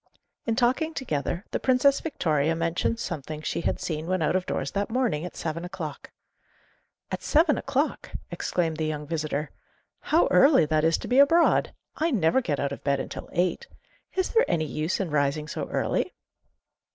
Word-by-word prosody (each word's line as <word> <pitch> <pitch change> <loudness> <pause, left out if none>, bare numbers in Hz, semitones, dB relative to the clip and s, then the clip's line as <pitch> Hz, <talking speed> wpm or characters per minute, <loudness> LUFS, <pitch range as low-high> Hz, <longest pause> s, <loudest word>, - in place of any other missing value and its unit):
In 225 - +1
talking 260 +7 +1
together, 175 - -2
the - - -1
Princess 265 +2 +3
Victoria 160 - 0
mentioned 170 +7 0
something 155 - -5
she - - -2
had - - -1
seen 155 -1 -3
when 185 -2 0
out 155 - +1
of 185 -1 0
doors - - -2
that 200 0 -1
morning 225 -10 0
at 180 - -8
seven 165 0 -4
o'clock. 175 -5 -6 1.0
'At - - -3
seven 310 0 +3
o'clock!' 280 +3 -1 0.2
exclaimed 165 -3 -1
the 155 0 -1
young 150 -1 -3
visitor; 150 -1 -3 0.5
'how 325 +3 +3
early 275 - +6
that 155 0 +1
is 165 0 +3
to - - -7
be 250 +2 +3
abroad! 330 +4 +5 0.3
I 320 +2 +1
never 210 - +2
get 150 - -2
out 140 - -1
of 140 - -7
bed 140 -1 +1
until - - -6
eight. 180 - 0 0.5
Is 375 -1 +1
there 460 - +4
any 165 -3 +1
use 155 +5 -2
in 185 -5 -2
rising 150 +1 0
so - - -4
early? - - -1
170 Hz, 175 wpm, -26 LUFS, 155-255 Hz, 1.0 s, early